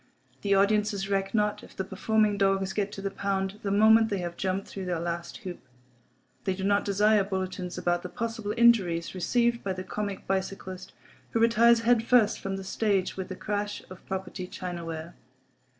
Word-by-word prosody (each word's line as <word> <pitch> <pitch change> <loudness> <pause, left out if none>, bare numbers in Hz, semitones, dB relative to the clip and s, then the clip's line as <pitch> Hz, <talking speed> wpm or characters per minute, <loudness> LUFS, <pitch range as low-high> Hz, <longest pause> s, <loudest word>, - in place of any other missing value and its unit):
The 200 -1 +2
audiences 200 0 +2
reck 195 0 0
not 210 -1 +1
if - - -14
the 190 - -2
performing 210 +2 +1
dogs 195 -1 +1
get 205 -1 -1
to 195 - -7
the 195 - -2
pound 195 0 -2
the 200 - -2
moment 220 +2 +5
they 200 - -1
have 175 -2 -4
jumped 190 +1 -2
through 195 -1 -6
their 175 -2 -1
last 170 0 -4
hoop. 180 -2 -5 0.8
They 190 - 0
do 190 - -5
not 200 +1 +2
desire 210 +1 +3
bulletins 185 -2 -4
about 175 0 0
the 180 - -6
possible 225 -2 -3
injuries 195 -8 +4
received 235 +6 +1
by 195 - -1
the 185 0 -5
comic 200 -1 -4
bicyclist 190 -1 -4 0.4
who 230 - +2
retires 230 +1 +5
head 235 0 +4
first 230 -3 +4
from 195 0 -3
the 195 - -6
stage 195 -1 0
in 190 -1 -4
a - - -5
crash 205 0 -3
of 185 - -11
(property) 190 -1 -4
china 175 -2 -6
ware. 165 0 -6
195 Hz, 185 wpm, -28 LUFS, 185-210 Hz, 0.8 s, moment